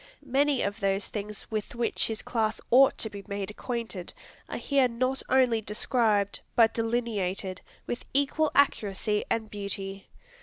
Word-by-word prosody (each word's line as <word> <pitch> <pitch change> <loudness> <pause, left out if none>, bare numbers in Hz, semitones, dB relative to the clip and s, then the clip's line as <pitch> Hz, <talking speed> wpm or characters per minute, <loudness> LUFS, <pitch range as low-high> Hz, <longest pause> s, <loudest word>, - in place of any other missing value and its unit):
Many 280 +1 +2
of 200 +2 -2
those 195 -1 +1
things 210 -1 -5
with 215 +1 -3
which 235 -1 +1
his 220 -1 -4
class 220 -2 0
ought 265 +3 +6
to - - -1
be 200 -1 -8
made 200 0 -3
acquainted, 225 -5 -4 0.4
are - - -3
here 275 -3 +3
not 255 +3 -1
only 250 -4 +4
described, 210 -1 +1 0.2
but 225 -2 +5
delineated, 210 -5 -1 0.2
with 240 - -4
equal 285 +3 +2
accuracy 210 -6 +2
and 220 -1 0
beauty. 200 -1 -5
220 Hz, 145 wpm, -28 LUFS, 200-245 Hz, 0.4 s, ought